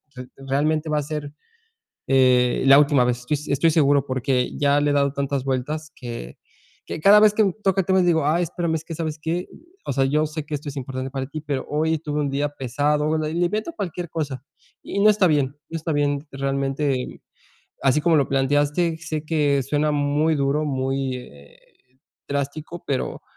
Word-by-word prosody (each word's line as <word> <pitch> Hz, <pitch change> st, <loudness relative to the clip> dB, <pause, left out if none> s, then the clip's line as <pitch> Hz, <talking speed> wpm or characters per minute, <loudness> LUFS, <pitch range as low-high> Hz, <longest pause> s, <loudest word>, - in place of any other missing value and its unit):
re 125 Hz, 0 st, -8 dB
realmente 150 Hz, +4 st, -1 dB
va 150 Hz, -1 st, +1 dB
a -, -, -2 dB
ser, 145 Hz, -1 st, -5 dB, 0.8 s
eh, 125 Hz, -2 st, +4 dB
la 135 Hz, +1 st, +9 dB
última 145 Hz, -3 st, +4 dB
vez. 125 Hz, 0 st, -1 dB
Yo, -, -, 0 dB, 0.2 s
estoy 140 Hz, +4 st, +3 dB
seguro 145 Hz, -3 st, +3 dB
porque 130 Hz, -1 st, -1 dB
ya 145 Hz, 0 st, +3 dB
le 145 Hz, 0 st, +1 dB
he -, -, +1 dB
dado 140 Hz, -1 st, +2 dB
tantas 140 Hz, -1 st, -2 dB
vueltas 150 Hz, +4 st, -3 dB
que 120 Hz, -, -8 dB, 0.5 s
que -, -, -5 dB
cada 205 Hz, +5 st, +8 dB
vez 210 Hz, -1 st, +5 dB
que 215 Hz, -, +3 dB
un 195 Hz, -3 st, +1 dB
toca 195 Hz, 0 st, +2 dB
temas, 190 Hz, 0 st, +2 dB
digo: 160 Hz, -4 st, +2 dB
"Ay, 170 Hz, +4 st, +2 dB
espérame, 170 Hz, -1 st, -2 dB
es 160 Hz, 0 st, -5 dB
que, 165 Hz, -, -6 dB
¿sabes 155 Hz, -1 st, -3 dB
qué? 170 Hz, +3 st, -2 dB, 0.4 s
O -, -, -2 dB
sea, 135 Hz, -1 st, +2 dB
yo 150 Hz, +3 st, +2 dB
sé 155 Hz, 0 st, -6 dB
que 150 Hz, -, -8 dB
esto 145 Hz, +1 st, -6 dB
es 140 Hz, -, -8 dB
importante 130 Hz, 0 st, -4 dB
para 135 Hz, -1 st, -3 dB
ti, 155 Hz, +2 st, -6 dB
pero 140 Hz, -3 st, -3 dB
hoy 160 Hz, +2 st, +1 dB
tuve 150 Hz, -1 st, -3 dB
un 145 Hz, -, -1 dB
día 140 Hz, +2 st, 0 dB
pesado", 145 Hz, +3 st, 0 dB
le 155 Hz, 0 st, -2 dB
le 175 Hz, +1 st, +1 dB
invento 215 Hz, -, -2 dB
cualquier 180 Hz, -3 st, -4 dB
cosa 145 Hz, -5 st, -4 dB, 0.4 s
y 200 Hz, -, -3 dB
no 210 Hz, -, +7 dB
está 210 Hz, -2 st, +4 dB
bien, 145 Hz, -4 st, +2 dB, 0.2 s
no -, -, -7 dB
está 160 Hz, +1 st, -3 dB
bien. 145 Hz, -1 st, 0 dB
Realmente, 135 Hz, 0 st, -2 dB, 0.6 s
así 135 Hz, +2 st, +3 dB
como 165 Hz, +1 st, +3 dB
lo 140 Hz, -3 st, +2 dB
planteaste, 145 Hz, +5 st, +1 dB
sé 155 Hz, -2 st, -5 dB
que 145 Hz, -4 st, +1 dB
suena 145 Hz, +3 st, 0 dB
muy 145 Hz, +2 st, +1 dB
duro, 140 Hz, +2 st, 0 dB
muy, 135 Hz, -2 st, -1 dB
eh, 70 Hz, -, -13 dB, 0.7 s
drástico, 145 Hz, +4 st, -4 dB
pero 135 Hz, -2 st, -2 dB
145 Hz, 195 wpm, -23 LUFS, 135-160 Hz, 0.8 s, la